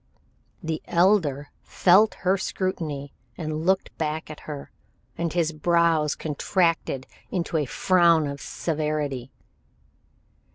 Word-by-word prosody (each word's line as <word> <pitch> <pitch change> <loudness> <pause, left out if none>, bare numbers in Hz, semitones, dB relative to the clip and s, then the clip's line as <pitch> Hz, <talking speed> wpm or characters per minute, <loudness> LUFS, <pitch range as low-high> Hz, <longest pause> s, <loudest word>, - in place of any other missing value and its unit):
The 160 -1 -2
Elder 170 -6 +2
felt 200 +4 +4
her 185 +2 +4
scrutiny 160 -8 -3 0.2
and 155 0 -3
looked 190 0 +1
back 155 0 -2
at 150 - -9
her, 145 -2 -7 0.4
and 170 -1 -2
his 165 -1 +1
brows 165 -1 +2
contracted 160 -3 0 0.2
into 170 -3 -2
a 150 - +1
frown 170 -1 +4
of 140 -1 -5
severity. 150 -5 -2
160 Hz, 110 wpm, -25 LUFS, 150-175 Hz, 0.4 s, felt